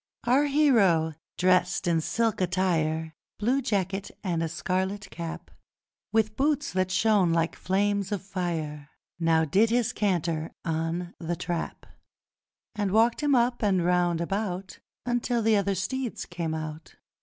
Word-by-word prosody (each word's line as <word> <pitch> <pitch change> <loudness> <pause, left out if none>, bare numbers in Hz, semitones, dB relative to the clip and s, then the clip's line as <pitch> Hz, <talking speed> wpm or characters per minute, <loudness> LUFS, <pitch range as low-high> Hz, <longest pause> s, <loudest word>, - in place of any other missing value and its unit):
Our 260 +5 +3
hero, 220 - +3 0.2
dressed 180 +1 +2
in 170 -2 +2
silk 225 +4 0
attire 165 -4 0 0.2
Blue 250 +6 +1
jacket 200 -4 -1
and 175 -4 -1
a 165 - -1
scarlet 190 +4 -2
cap 165 -1 -7 0.6
With 220 -1 +1
boots 295 -2 0
that 185 0 +1
shone 190 -2 +3
like 165 0 +1
flames 200 +1 0
of 200 -3 -2
fire, 160 -6 -4 0.3
Now 165 -1 +3
did 205 +9 +3
his 235 -1 +1
canter 170 -5 -1
on 165 +2 -2
The 170 0 -2
Trap, 170 0 -4 0.9
And 205 -3 -1
walked 230 +5 +3
him 290 -2 +3
up 240 0 +2
and 190 -5 +2
round 175 -1 +2
about, 190 0 -3 0.3
Until 240 -1 0
the 220 0 +4
other 200 -1 +1
steeds 250 +6 -3
came 170 -3 -3
out. 155 0 -7
185 Hz, 140 wpm, -27 LUFS, 170-220 Hz, 0.9 s, the